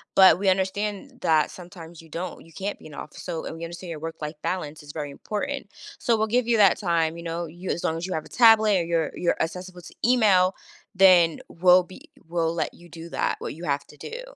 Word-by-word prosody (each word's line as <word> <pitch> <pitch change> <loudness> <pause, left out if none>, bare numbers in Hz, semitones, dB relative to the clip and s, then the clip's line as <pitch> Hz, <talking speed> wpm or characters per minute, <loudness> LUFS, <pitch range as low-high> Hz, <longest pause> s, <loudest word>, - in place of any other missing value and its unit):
but 185 -3 +7
we 200 - -1
understand 200 +6 -1
that 155 -2 +3
sometimes 170 -2 -11
you 165 - -16
don't 170 +2 -6
you 165 - -18
can't 200 +1 -4
be - - -16
in 150 - -13
the - - -10
office. - - -9
So 165 -3 -4
and 160 - -6
we 165 - -5
understand 175 +2 -8
your 155 - -6
work-life 160 -1 -6
balance 155 -5 -3
is 145 0 -11
very 145 -2 -5
important, 220 - -4 0.3
so 230 -3 +2
we'll 220 - +1
give 240 +2 +1
you 235 - +3
that 200 -3 +5
time, 170 -3 0
you 170 - -8
know, 170 +1 -3
you 175 +3 -8
as 170 - -3
long 160 - 0
as 175 - -4
you 185 - -3
have 155 - -2
a - - -14
tablet, 220 -4 +6
or - - 0
you're 165 -2 0
you're 175 - 0
accessible 180 +2 -4
to 175 - -13
email, 200 -7 +4 0.4
then 180 -4 +6
we'll 180 +1 +5
be 185 +1 -15 0.2
we'll 165 -1 0
let 170 - -2
you 175 - -16
do 165 +1 -10
that- - - -1
what - - -5
you 170 +3 -8
have 140 -1 -1
to 150 - -16
do." 485 +2 -7
175 Hz, 240 wpm, -25 LUFS, 165-195 Hz, 0.4 s, but